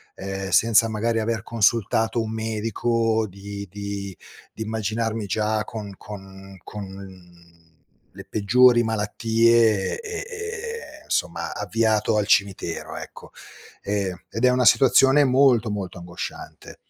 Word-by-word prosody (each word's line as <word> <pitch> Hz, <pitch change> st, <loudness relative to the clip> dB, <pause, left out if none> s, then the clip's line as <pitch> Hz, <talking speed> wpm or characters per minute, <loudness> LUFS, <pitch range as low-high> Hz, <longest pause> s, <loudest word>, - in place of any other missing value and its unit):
ehm, 95 Hz, 0 st, -5 dB
senza 115 Hz, +1 st, +4 dB
magari 115 Hz, +1 st, -1 dB
aver 110 Hz, 0 st, -2 dB
consultato 115 Hz, +1 st, +1 dB
un 110 Hz, 0 st, -4 dB
medico, 115 Hz, 0 st, 0 dB
di 100 Hz, +1 st, -8 dB
di 100 Hz, -1 st, -6 dB, 0.4 s
di 110 Hz, -, -10 dB
immaginarmi 110 Hz, 0 st, -2 dB
già 105 Hz, +2 st, 0 dB
con 105 Hz, -3 st, -7 dB
con 95 Hz, -1 st, -11 dB
con 95 Hz, -4 st, -11 dB, 0.6 s
le -, -, -10 dB
peggiori 120 Hz, +3 st, +5 dB
malattie 110 Hz, 0 st, +2 dB
e 465 Hz, -2 st, -8 dB
e 435 Hz, -, -3 dB
ehm, 465 Hz, 0 st, -7 dB
somma -, -, -2 dB
avviato 110 Hz, -1 st, +1 dB
al 105 Hz, -, +1 dB
cimitero, 95 Hz, -5 st, 0 dB
ecco. -, -, -10 dB, 0.5 s
Ehm, 100 Hz, -3 st, -2 dB
ed 115 Hz, +4 st, 0 dB
è -, -, +6 dB
una 125 Hz, 0 st, +2 dB
situazione 135 Hz, +3 st, +6 dB
molto 130 Hz, -4 st, +4 dB
molto 95 Hz, -3 st, -5 dB
angosciante. 85 Hz, 0 st, -8 dB
110 Hz, 120 wpm, -23 LUFS, 100-115 Hz, 0.6 s, è